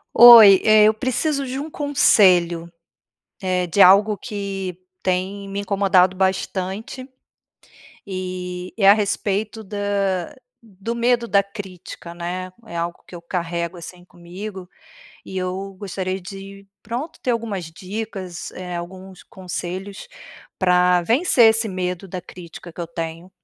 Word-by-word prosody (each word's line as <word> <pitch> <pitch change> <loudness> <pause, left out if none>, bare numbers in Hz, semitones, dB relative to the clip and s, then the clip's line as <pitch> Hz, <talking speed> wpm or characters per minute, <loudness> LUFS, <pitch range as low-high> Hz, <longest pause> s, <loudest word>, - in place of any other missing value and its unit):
Oi, 225 -5 +10
eh, 215 -1 +6
eu 215 +1 +5
preciso 260 +5 -1
de 260 +1 -4
um 300 +3 -6
conselho, 180 - +3 0.7
eh, 185 -2 -1
de 195 +4 +2
algo 205 +3 +5
que 195 -3 -5 0.3
tem 190 +2 -2
me 195 +1 -4
incomodado 195 -2 +2
bastante. 190 +5 -2 1.0
E 180 -1 -6
é 195 -3 +5
a - - +10
respeito 210 +1 -2
da 200 +2 -2 0.3
do 205 +3 -6
medo 235 0 +1
da 200 -1 +3
crítica, 190 -4 -10
né? 180 +2 -5
É 195 - -10
algo 170 +1 -3
que - - -16
eu 170 - -9
carrego, 170 0 -4
assim, 175 +1 -11
comigo 180 +2 -9 0.6
e 190 - -9
eu 190 +1 -4
gostaria 190 -1 -4
de, 195 +1 -10 0.2
pronto, 250 +7 -5
ter 250 - -1
algumas 215 -6 -3
dicas, 185 +1 -7
eh, 180 -1 -7
alguns 185 +2 -9
conselhos 185 +2 -7 0.5
pra 180 -1 +3
vencer 240 - +3
esse 225 0 +1
medo 185 -1 -4
da 185 0 -6
crítica 175 -1 -12
que 170 - -15
eu 170 - -3
tenho. 165 +1 -6
190 Hz, 135 wpm, -21 LUFS, 180-210 Hz, 1.0 s, Oi